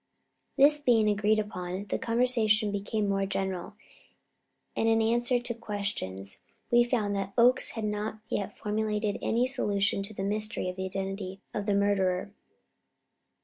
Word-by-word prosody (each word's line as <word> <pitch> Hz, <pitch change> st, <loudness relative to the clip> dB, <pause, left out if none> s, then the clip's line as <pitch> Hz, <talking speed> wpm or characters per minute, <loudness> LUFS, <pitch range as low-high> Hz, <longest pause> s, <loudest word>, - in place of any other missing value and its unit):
This 295 Hz, +2 st, +6 dB
being 235 Hz, -6 st, +3 dB
agreed 210 Hz, +1 st, +2 dB
upon, 185 Hz, -2 st, -4 dB
the -, -, -1 dB
conversation 230 Hz, -3 st, +2 dB
became 205 Hz, +1 st, -1 dB
more 195 Hz, 0 st, 0 dB
general, 190 Hz, +1 st, -3 dB, 1.0 s
and 225 Hz, -, +2 dB
in 225 Hz, 0 st, +4 dB
answer 240 Hz, +2 st, +2 dB
to 240 Hz, 0 st, -4 dB
questions 200 Hz, -, -4 dB, 0.3 s
we 240 Hz, 0 st, +6 dB
found 220 Hz, -5 st, 0 dB
that 195 Hz, 0 st, -3 dB
Oakes 245 Hz, +2 st, +4 dB
had 220 Hz, -, -2 dB
not 210 Hz, +1 st, -2 dB
as -, -, -21 dB
yet 200 Hz, 0 st, -3 dB
formulated 210 Hz, -1 st, -1 dB
any 235 Hz, +2 st, +1 dB
solution 205 Hz, -7 st, +1 dB
to 200 Hz, +2 st, -6 dB
the 195 Hz, -, -3 dB
mystery 215 Hz, +1 st, -2 dB
of 180 Hz, -, -5 dB
the 190 Hz, 0 st, -4 dB
identity 195 Hz, 0 st, -4 dB
of 205 Hz, 0 st, -3 dB
the 205 Hz, -, +2 dB
murderer. 195 Hz, -2 st, +1 dB
210 Hz, 150 wpm, -29 LUFS, 195-225 Hz, 1.0 s, This